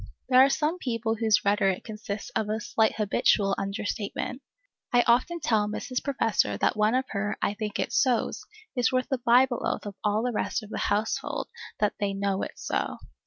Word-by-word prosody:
There 255 Hz, 0 st, +8 dB
are 275 Hz, -, +5 dB
some 305 Hz, +5 st, 0 dB
people 230 Hz, -5 st, -1 dB
whose 220 Hz, -2 st, +2 dB
rhetoric 200 Hz, -2 st, +2 dB
consists 210 Hz, -2 st, -6 dB
of 220 Hz, -2 st, -1 dB
a 215 Hz, +1 st, -1 dB
slight 220 Hz, 0 st, +1 dB
habitual 200 Hz, -1 st, +2 dB
under 195 Hz, +1 st, -3 dB
statement. 220 Hz, +5 st, -3 dB, 0.5 s
I 245 Hz, 0 st, +5 dB
often 255 Hz, +9 st, +2 dB
tell 220 Hz, -7 st, +1 dB
Mrs. 250 Hz, +4 st, -3 dB
Professor 225 Hz, -, +1 dB
that -, -, +1 dB
one 215 Hz, +2 st, +2 dB
of 260 Hz, +1 st, +1 dB
her 205 Hz, 0 st, -2 dB
"I -, -, 0 dB
think 210 Hz, 0 st, -4 dB
it's -, -, +1 dB
sos" 250 Hz, -4 st, +1 dB, 0.3 s
is 245 Hz, -3 st, +2 dB
worth 255 Hz, -1 st, 0 dB
the 265 Hz, -, 0 dB
Bible 245 Hz, +1 st, +4 dB
oath -, -, -2 dB
of 205 Hz, -, -5 dB
all 210 Hz, +1 st, +1 dB
the 250 Hz, -, 0 dB
rest 220 Hz, +1 st, -2 dB
of 215 Hz, -, -12 dB
the -, -, -3 dB
household 210 Hz, +2 st, -1 dB, 0.3 s
that 210 Hz, -1 st, +2 dB
they 200 Hz, -1 st, -1 dB
"know 195 Hz, -1 st, -1 dB
it's -, -, -6 dB
so." -, -, -1 dB
220 Hz, 195 wpm, -27 LUFS, 205-245 Hz, 0.5 s, There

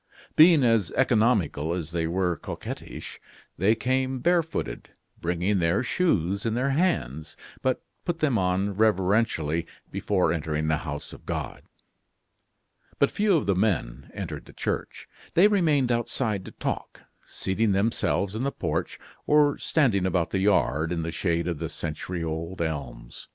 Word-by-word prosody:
Being 160 Hz, -2 st, +7 dB
as 115 Hz, -7 st, +3 dB
economical 105 Hz, -, +2 dB
as 85 Hz, -3 st, -5 dB
they 85 Hz, -1 st, -1 dB
were 90 Hz, 0 st, 0 dB
coquettish, -, -, -7 dB, 0.4 s
they 105 Hz, +5 st, +4 dB
came 130 Hz, +3 st, 0 dB
barefooted, 165 Hz, +3 st, -1 dB, 0.3 s
bringing 90 Hz, +4 st, 0 dB
their 85 Hz, +7 st, +2 dB
shoes 100 Hz, -, +1 dB
in 115 Hz, -2 st, -1 dB
their 130 Hz, +3 st, +1 dB
hands, 80 Hz, -, -1 dB, 0.2 s
but 130 Hz, -1 st, 0 dB, 0.2 s
put 175 Hz, -2 st, -2 dB
them 155 Hz, -6 st, +1 dB
on 95 Hz, 0 st, +1 dB
reverentially 95 Hz, -6 st, +1 dB, 0.2 s
before 90 Hz, -5 st, +1 dB
entering 80 Hz, -1 st, -2 dB
the 80 Hz, 0 st, +2 dB
house 75 Hz, -2 st, -6 dB
of -, -, -14 dB
God. -, -, -4 dB, 1.4 s
But 140 Hz, -, +3 dB
few 205 Hz, -4 st, +3 dB
of 150 Hz, -, -1 dB
the 100 Hz, -, +2 dB
men 85 Hz, -, -1 dB
entered -, -, -5 dB
the -, -, -15 dB
church. -, -, -4 dB, 0.3 s
They 180 Hz, +5 st, +7 dB
remained 155 Hz, -11 st, +2 dB
outside 115 Hz, -4 st, -1 dB
to -, -, -9 dB
talk, -, -, -4 dB, 0.2 s
seating 100 Hz, +3 st, -1 dB
themselves 100 Hz, -1 st, 0 dB
in 110 Hz, -, -3 dB
the 140 Hz, +1 st, 0 dB
porch, -, -, -3 dB, 0.3 s
or 150 Hz, -1 st, +4 dB
standing 110 Hz, -, +2 dB
about 85 Hz, -2 st, 0 dB
the 95 Hz, -, 0 dB
yard, 80 Hz, -5 st, +2 dB
in 85 Hz, -2 st, -1 dB
the 85 Hz, -, -3 dB
shade 85 Hz, +1 st, -1 dB
of 85 Hz, -4 st, -2 dB
the -, -, -3 dB
century 85 Hz, +2 st, -4 dB
old 85 Hz, +3 st, -4 dB
elms. 70 Hz, -7 st, -5 dB
95 Hz, 150 wpm, -26 LUFS, 85-125 Hz, 1.4 s, Being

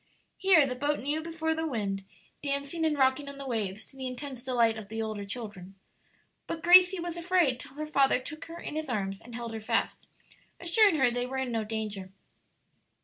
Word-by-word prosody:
Here 370 Hz, -7 st, +6 dB
the 260 Hz, -, -2 dB
boat 290 Hz, +3 st, 0 dB
new 295 Hz, +4 st, -2 dB
before 320 Hz, 0 st, -2 dB
the 320 Hz, 0 st, -2 dB
wind, 200 Hz, -7 st, -2 dB, 0.4 s
dancing 280 Hz, +3 st, -1 dB
and 305 Hz, -2 st, +1 dB
rocking 265 Hz, +1 st, +2 dB
on 280 Hz, -, -9 dB
the 275 Hz, -, -7 dB
waves 215 Hz, -5 st, -3 dB
to -, -, -11 dB
the 260 Hz, -1 st, -5 dB
intense 255 Hz, 0 st, -6 dB
delight 235 Hz, -4 st, +2 dB
of 215 Hz, -2 st, -8 dB
the 225 Hz, +1 st, -5 dB
older 215 Hz, -2 st, -3 dB
children; 200 Hz, -4 st, -7 dB, 0.7 s
but 325 Hz, -1 st, -4 dB
Gracie 360 Hz, +1 st, +8 dB
was 345 Hz, 0 st, -4 dB
afraid 340 Hz, -7 st, +2 dB
till 260 Hz, -, -10 dB
her 305 Hz, +1 st, -4 dB
father 275 Hz, -4 st, +3 dB
took 305 Hz, +4 st, -8 dB
her 330 Hz, +1 st, -9 dB
in -, -, -6 dB
his 310 Hz, -2 st, -3 dB
arms 195 Hz, -4 st, -2 dB
and 235 Hz, 0 st, -11 dB
held 235 Hz, -1 st, -5 dB
her 220 Hz, -, -5 dB
fast, 215 Hz, -, -1 dB, 0.5 s
assuring 360 Hz, +2 st, +4 dB
her 260 Hz, -5 st, +4 dB
they 245 Hz, +1 st, -2 dB
were 265 Hz, +1 st, -4 dB
in 260 Hz, -2 st, -1 dB
no 225 Hz, -1 st, 0 dB
danger. 210 Hz, -3 st, -4 dB
265 Hz, 205 wpm, -29 LUFS, 225-315 Hz, 0.7 s, Gracie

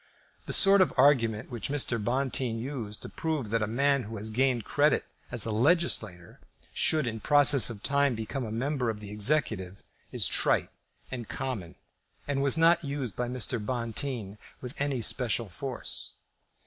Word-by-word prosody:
The -, -, -3 dB
sort 195 Hz, 0 st, +6 dB
of 185 Hz, -, +3 dB
argument 125 Hz, -5 st, +3 dB
which 120 Hz, -1 st, -4 dB
Mr. 125 Hz, -6 st, 0 dB
Bonteen 125 Hz, -1 st, -1 dB
used 115 Hz, -4 st, -5 dB
to -, -, -6 dB
prove 155 Hz, -9 st, -3 dB
that 115 Hz, -1 st, +1 dB
a 110 Hz, -, 0 dB
man 140 Hz, +4 st, +1 dB
who 110 Hz, +2 st, -7 dB
has 110 Hz, +2 st, -6 dB
gained 125 Hz, -1 st, +1 dB
credit 145 Hz, 0 st, +2 dB, 0.2 s
as 120 Hz, -4 st, -1 dB
a 115 Hz, -, -2 dB
legislator 110 Hz, -, 0 dB, 0.3 s
should 155 Hz, -3 st, +2 dB
in 115 Hz, -2 st, -3 dB
process 145 Hz, 0 st, +6 dB
of 105 Hz, -4 st, -8 dB
time 140 Hz, -2 st, +2 dB
become 110 Hz, +5 st, -4 dB
a 110 Hz, -, -5 dB
member 125 Hz, +2 st, -1 dB
of 110 Hz, -2 st, -4 dB
the 105 Hz, -1 st, -9 dB
executive, 105 Hz, -5 st, 0 dB, 0.3 s
is -, -, +1 dB
trite -, -, +1 dB, 0.4 s
and 120 Hz, -4 st, -6 dB
common, 125 Hz, -11 st, -5 dB, 0.5 s
and 140 Hz, -1 st, -1 dB
was 140 Hz, +2 st, +4 dB
not 170 Hz, +1 st, +4 dB
used 140 Hz, -8 st, -4 dB
by 125 Hz, -, -2 dB
Mr. 125 Hz, -2 st, -1 dB
Bonteen 115 Hz, -2 st, -4 dB, 0.2 s
with 125 Hz, +2 st, -7 dB
any 140 Hz, -4 st, -1 dB
special 115 Hz, -1 st, 0 dB
force. 130 Hz, +9 st, -5 dB
125 Hz, 165 wpm, -28 LUFS, 110-140 Hz, 0.5 s, sort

